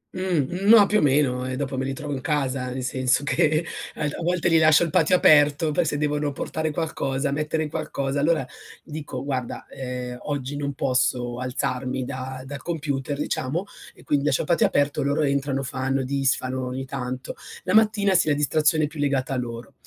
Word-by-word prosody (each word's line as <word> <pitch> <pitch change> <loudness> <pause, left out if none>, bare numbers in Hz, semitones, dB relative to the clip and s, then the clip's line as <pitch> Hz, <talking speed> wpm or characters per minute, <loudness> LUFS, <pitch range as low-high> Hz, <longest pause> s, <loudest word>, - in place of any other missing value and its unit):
Mh, - - -4 0.3
mhmm, 190 +5 -2
ma 220 -3 +9
più 210 +2 +2
o - - 0
meno 135 -3 +2
e 130 - -3
dopo 135 0 -3
me 130 0 -2
li 135 - -2
trovo 145 +1 -5
in 130 - -4
casa, 135 -2 -1
nel 130 +1 -4
senso 130 +2 +1
che 155 +3 +2 0.3
alt 150 -1 -2
a - - -6
volte 175 0 0
li 165 -1 +5
lascio 155 +1 +6
il 165 - -2
patio 165 +3 +4
aperto 150 -1 +5
per 165 +2 +1
se 145 - -1
devono 150 0 0
portare 155 +3 -3
qualcosa, 140 -3 -2
mettere 150 +2 -1
qualcosa, 140 -1 -3
allora 155 -2 +2 0.4
dico 150 -4 -6
guarda, 130 -3 -4
ehm, 125 -1 -5
oggi 145 -1 -4
non 140 -1 -3
posso 125 -2 0
alzarmi 125 0 -2
da 130 +1 -6
dal 140 0 -7
computer, 145 -4 -3
diciamo, 150 +4 -2 0.3
e - - -17
quindi 145 -1 0
lascio 140 - +2
il - - -5
patio 170 - +4
aperto, 145 0 +1
loro 145 +2 +1
entrano, 140 -1 0
fanno, 135 +1 -1
disfano 130 -1 -1
ogni 130 +1 -4
tanto. 130 -1 -5 0.3
La 185 +1 -1
mattina, 210 -3 +4
sì, 170 - +3
la 145 - +3
distrazione 155 +2 +2
è - - +2
più 150 +1 -10
legata 140 -2 0
a - - -1
loro. 120 -1 -6
140 Hz, 195 wpm, -24 LUFS, 130-155 Hz, 0.4 s, ma